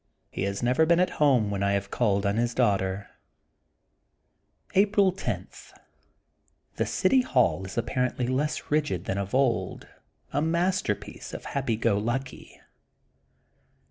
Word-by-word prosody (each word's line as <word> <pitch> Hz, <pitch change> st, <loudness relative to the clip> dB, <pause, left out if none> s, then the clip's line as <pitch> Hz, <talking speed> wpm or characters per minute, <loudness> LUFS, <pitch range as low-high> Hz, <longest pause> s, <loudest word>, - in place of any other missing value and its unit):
He -, -, -5 dB
has 100 Hz, +3 st, -3 dB
never 130 Hz, +6 st, +3 dB
been 170 Hz, +1 st, +4 dB
at 180 Hz, -, +2 dB
home 125 Hz, -8 st, +4 dB
when 100 Hz, -1 st, -2 dB
I 100 Hz, 0 st, +2 dB
have 100 Hz, 0 st, -2 dB
called 100 Hz, -4 st, +1 dB
on 100 Hz, +2 st, +1 dB
his 120 Hz, 0 st, 0 dB
daughter. 100 Hz, -4 st, +1 dB, 1.7 s
April 200 Hz, 0 st, +4 dB
10: 190 Hz, -, -4 dB, 0.6 s
— -, -, -44 dB
The -, -, 0 dB
city 265 Hz, -1 st, +3 dB
hall 125 Hz, -, +1 dB
is 95 Hz, -, -9 dB
apparently 125 Hz, +1 st, -1 dB
less 135 Hz, +5 st, -2 dB
rigid 150 Hz, -, 0 dB
than 95 Hz, -, -2 dB
of 100 Hz, +4 st, -3 dB
old, 130 Hz, -4 st, 0 dB, 0.5 s
a 145 Hz, -, +1 dB
masterpiece 170 Hz, -, -1 dB
of -, -, -7 dB
the -, -, -7 dB
hap 135 Hz, -1 st, -3 dB
py 115 Hz, -, +2 dB
go 110 Hz, -2 st, +1 dB
lucky. 125 Hz, +4 st, -4 dB
120 Hz, 145 wpm, -27 LUFS, 100-150 Hz, 1.7 s, been